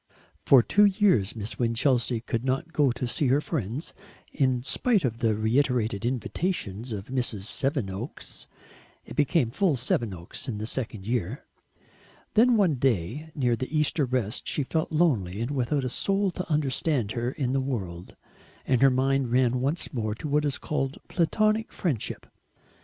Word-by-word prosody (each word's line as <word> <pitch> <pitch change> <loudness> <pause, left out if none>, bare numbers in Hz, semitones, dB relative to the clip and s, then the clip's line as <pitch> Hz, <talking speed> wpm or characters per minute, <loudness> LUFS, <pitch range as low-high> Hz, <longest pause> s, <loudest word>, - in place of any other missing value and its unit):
For 130 -4 +7
two 205 - +4
years 190 - +3
Miss 110 0 -5
Winchelsea 120 0 +1
could 115 0 -3
not 135 +6 -1
go 145 -4 +3
to 125 +1 -3
see 125 +4 0
her 135 +3 +4
friends, 145 - -4 0.4
in 130 -3 +1
spite 205 - +1
of 115 -2 -2
the 115 -3 +2
reiterated 115 -1 +1
invitations 125 - -3
of 100 0 -5
Mrs. 120 -6 -2
Sevenoaks 115 -1 -3 0.6
it - - -9
became 140 -4 +2
full 185 0 +2
Sevenoaks 115 -6 -3
in 115 -5 -3
the 105 - -4
second 110 -4 -4
year. 120 - -2 0.9
Then 235 +2 +5
one 180 -9 +3
day 130 - 0
near 125 -4 +2
the 130 +3 -4
Easter 150 -1 +2
rest 125 -4 -2
she 145 - 0
felt 160 +4 -2
lonely 120 - +1
and 120 +4 -2
without 135 0 0
a - - -1
soul 195 +8 0
to 180 0 -6
understand 140 -5 +1
her 120 +1 -1
in 130 -3 -1
the 135 - +1
world, 95 -10 -5 0.5
and 130 -2 +2
her 135 - +7
mind 135 -1 +1
ran 125 0 +2
once 150 +6 -1
more 110 -4 -2
on 150 - -4
what 150 +1 +2
is 140 -2 0
called 135 -3 -2
Platonic 215 +6 +1
friendship. 150 - -2
130 Hz, 160 wpm, -27 LUFS, 115-150 Hz, 0.9 s, For